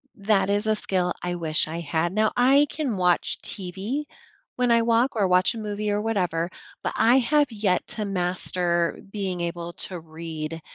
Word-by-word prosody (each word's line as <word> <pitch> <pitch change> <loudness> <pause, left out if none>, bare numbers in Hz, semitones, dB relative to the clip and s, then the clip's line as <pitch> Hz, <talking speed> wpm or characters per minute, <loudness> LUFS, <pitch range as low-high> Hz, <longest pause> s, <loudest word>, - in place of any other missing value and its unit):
That 200 -1 +2
is 205 +2 0
a 215 - +3
skill 180 -4 0
I 180 0 -1
wish 160 -3 0
I 165 +2 -4
had, 170 +2 -1
now 215 +1 +2
I 275 +4 +5
can 280 -9 -2
watch 180 -1 +1
TV 200 +9 -4 0.5
when 250 -1 +2
I 230 0 +5
walk 235 +3 +2
or 205 -3 +2
watch 185 +5 +3
a - - -6
movie, 210 -1 -3
or 205 0 0
whatever, 180 -6 0 0.3
but - - -1
I 240 +3 +5
have 290 +1 +3
yet 205 -4 0
to 210 -1 -3
master 180 -2 0
being 190 -4 -3
able 170 0 -4
to 180 +1 -5
read 160 0 -6
195 Hz, 180 wpm, -25 LUFS, 175-225 Hz, 0.5 s, I